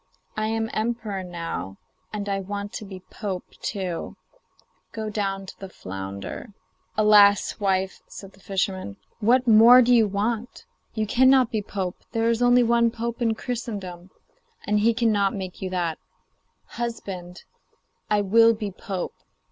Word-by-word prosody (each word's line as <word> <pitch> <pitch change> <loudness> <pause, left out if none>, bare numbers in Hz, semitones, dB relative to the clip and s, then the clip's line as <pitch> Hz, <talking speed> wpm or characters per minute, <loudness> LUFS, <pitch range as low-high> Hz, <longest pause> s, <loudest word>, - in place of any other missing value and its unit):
I 215 0 -1
am 225 0 -2
emperor 220 -3 -2
now, 165 - -5 0.3
and 205 -1 -4
I 195 -1 -1
want 200 +1 -5
to 215 - -6
be 190 -2 -9
pope 195 -4 -5
too; 185 -5 -4 0.8
go 220 -1 -4
down 195 -2 -2
to - - -12
the 195 - -8
flounder.' 100 - -7 0.4
'Alas! 210 -1 +5
wife,' 190 -1 0
said 195 -1 -10
the 190 - -21
fisherman, 190 - -3 0.2
'what 245 +3 +3
more 235 +3 +8
do 245 +1 +4
you 225 -3 +5
want? 215 +4 -3 0.3
You 220 -1 0
cannot 260 +2 +4
be 220 - -1
pope; 190 -3 -4 0.2
there 230 0 +2
is 230 +1 -1
only 245 0 +5
one 235 0 +3
pope 235 +1 -5
in 225 -2 +1
Christendom, 200 -8 -5 0.6
and 210 0 +2
he 225 +2 +3
cannot 215 -4 +2
make 190 -2 -6
you 190 - -3
that.' 175 -3 -2 0.7
'Husband,' 195 -7 -6
she - - -13
said, - - -44
'I 210 -1 +3
will 225 +3 +5
be 210 -2 -4
pope. 190 -1 -5
205 Hz, 155 wpm, -24 LUFS, 190-230 Hz, 0.8 s, more